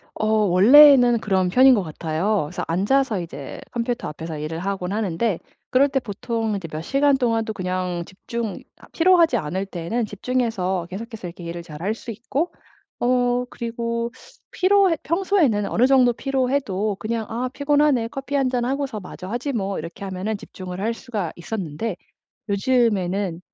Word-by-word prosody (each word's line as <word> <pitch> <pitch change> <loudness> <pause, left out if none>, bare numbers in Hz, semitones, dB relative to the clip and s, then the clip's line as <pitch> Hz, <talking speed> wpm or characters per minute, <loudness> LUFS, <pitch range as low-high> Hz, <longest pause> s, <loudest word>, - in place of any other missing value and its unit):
어 - - -2
원래는 235 +5 +7
그런 190 -3 +1
편인 260 +7 +7
것 205 - +2
같아요. 165 +5 -1
그래서 175 +3 -5
앉아서 210 +6 +1
이제 145 -5 -8
컴퓨터 240 0 -2
앞에서 160 +1 -6
일을 160 +2 -4
하곤 190 -1 -3
하는데 205 -2 -1 0.3
그럴 275 +2 +4
때 270 - +1
보통 225 -1 -3
이제 190 -4 -5
몇 155 - -4
시간 275 - +2
동안도 225 -3 0
그냥 180 -2 -2
집중이 220 +4 -5
아 - - -16
피로하지 335 -6 +4
않을 185 +1 -3
때에는 195 +6 -3
집중해서 205 -5 -1
계속해서 215 +1 -7
이렇게 175 +1 -10
일을 170 +1 -5
잘할 170 +5 -4
수 230 +1 -8
있고 260 - -3 0.5
어 245 0 +2
그리고 235 0 -3 0.4
피로해 380 -3 +3
평소에는 335 - +2
어느 245 - +3
정도 255 -3 +5
피로해도 255 -7 -1
그냥 225 0 -2
'아 240 +3 -2
피곤하네, 285 -4 +2
커피 270 +3 -7
한잔 255 -3 +1
하고서 270 -3 -2
마저 185 -1 -9
하지 245 +7 -3
뭐.' 200 -4 -2
이렇게 170 +4 -7
하면은 195 +3 -3
집중을 185 -2 -8
할 225 +3 0
수가 210 -10 -4
있었는데 180 +1 -4 0.6
요즘에는 200 -5 +1
220 Hz, 350 characters per minute, -22 LUFS, 185-255 Hz, 0.6 s, 원래는